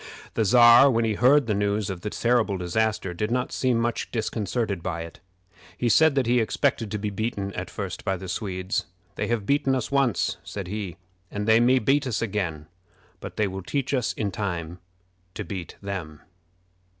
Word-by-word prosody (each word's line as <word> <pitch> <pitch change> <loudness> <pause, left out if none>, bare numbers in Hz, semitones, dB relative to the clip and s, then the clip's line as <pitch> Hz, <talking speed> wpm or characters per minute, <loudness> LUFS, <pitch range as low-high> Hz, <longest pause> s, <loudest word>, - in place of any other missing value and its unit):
The 110 - +1
Czar, 120 +4 +8
when 115 -3 +2
he 110 - +1
heard 130 +6 +4
the 110 - 0
news 100 0 0
of 90 -2 -6
this 105 - -5
terrible 115 -4 +2
disaster, 95 +1 -1
did 105 +5 -2
not 125 +1 -1
seem 125 -3 +1
much 115 0 -1
disconcerted 110 -3 -2
by 85 0 -3
it. 85 - -11 0.6
He 120 - +1
said 160 +4 +5
that 135 -2 +2
he 120 +1 +3
expected 115 0 0
to 105 - -2
be 105 0 -3
beaten 100 -1 -3
at 90 - -5
first 95 -3 -5
by 95 -2 -1
the 95 +1 -8
Swedes. 95 +2 -3 0.3
"They - - -3
have 115 -4 -1
beaten 135 +1 +2
us 130 0 -3
once," 140 -5 +1
said 100 -2 -6
he, 100 -2 -5 0.3
"and 105 +1 -4
they 110 +1 +6
may 125 +2 +4
beat 135 +4 +2
us 115 - -1
again; 95 -9 -2 0.5
but - - -9
they 105 - +2
will 95 0 -5
teach 135 +7 -2
us 125 -4 +1
in 105 -3 -2
time 90 -4 -4 0.6
to - - -4
beat 95 -4 -6
them." 90 -7 -5
105 Hz, 190 wpm, -25 LUFS, 95-120 Hz, 0.6 s, Czar